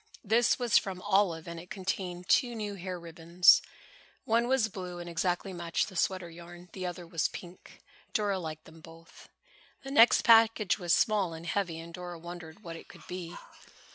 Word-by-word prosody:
This 230 +3 +3
was 245 -3 +4
from 190 -2 -6
Olive 190 -5 +1
and 170 0 -6
it 175 +2 -12
contained 185 -2 -4
two 240 +2 +3
new 210 -2 -4
hair 185 -1 -6
ribbons. 170 +1 +4 0.6
One 235 +2 +2
was 260 -3 +2
blue 180 -3 -7
and 175 0 -7
exactly 175 +3 -2
matched 170 +2 -1
the 190 - -13
sweater 185 0 0
yarn. 175 +1 -12
The 185 -2 -4
other 175 0 -6
was 165 -1 0
pink. 175 0 -12 0.3
Dora 205 -3 0
liked 155 -3 -7
them 160 0 -15
both. 165 +1 -15 0.5
The 270 - -7
next 240 -4 +6
package 225 -4 +5
was 175 -2 -2
small 190 0 +2
and 165 +1 -9
heavy 175 -2 -2
and 170 +1 -10
Dora 175 0 -7
wondered 175 +2 -10
what 165 -2 -7
it - - -13
could - - -15
be. 180 -2 -6
180 Hz, 180 wpm, -30 LUFS, 170-200 Hz, 0.6 s, next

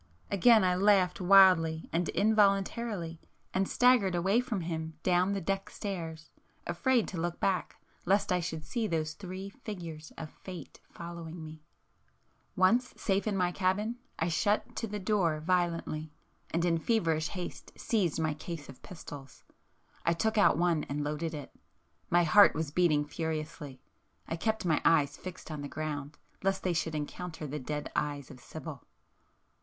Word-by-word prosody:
Again 220 +2 +6
I 180 -1 +3
laughed 190 -1 +3
wildly 180 -4 +6
and 170 0 +1
involuntarily, 200 -3 +1 0.3
and 190 0 +1
staggered 245 -7 +4
away 190 +6 +3
from 235 -7 -3
him 160 -1 -4
down 185 +2 +3
the 200 - -1
deck 195 +2 -2
stairs, 165 -6 -6 0.3
afraid 235 +7 +1
to 170 -4 -4
look 175 0 -2
back 190 -2 0 0.3
lest 195 +2 +2
I 180 - +3
should 160 -2 -4
see 235 -3 -1
those 155 -3 -1
Three 190 +3 -7
Figures 175 -10 -8
of 155 -1 -7
fate 185 -2 -10
following 170 -1 -8
me. 155 0 -10 0.9
Once 230 +7 +3
safe 195 +1 0
in 205 -2 0
my 180 -1 +2
cabin 205 +6 0 0.2
I 160 - 0
shut 205 +6 0
to 225 - -2
the 210 0 -4
door 185 -6 +1
violently, 165 -2 -1 0.4
and 170 +1 0
in 165 -1 +2
feverish 165 -6 +1
haste, 180 -2 -7
seized 185 -9 0
my 160 -1 +1
case 155 -1 -7
of 135 - -12
pistols. 145 -6 -10 0.6
I 170 - +3
took 220 +6 0
out 205 -7 +5
one 170 -3 +2
and 145 +1 -3
loaded 150 +2 -2
it. 145 - -8 0.6
My 175 0 +4
heart 200 +5 +7
was 155 -1 -2
beating 155 -3 +3
furiously,—I 155 -2 -6
kept 220 +4 -1
my 160 -3 +2
eyes 145 -3 +4
fixed 180 -1 -9
on 150 -2 -5
the 145 - -4
ground, 150 -1 -5 0.2
lest 195 0 0
they 180 - +1
should 160 -1 -1
encounter 160 +2 -5
the 150 +1 -4
dead 150 +2 -4
eyes 145 -2 -2
of 130 - -12
Sibyl. 155 +1 -8
175 Hz, 160 wpm, -31 LUFS, 155-195 Hz, 0.9 s, heart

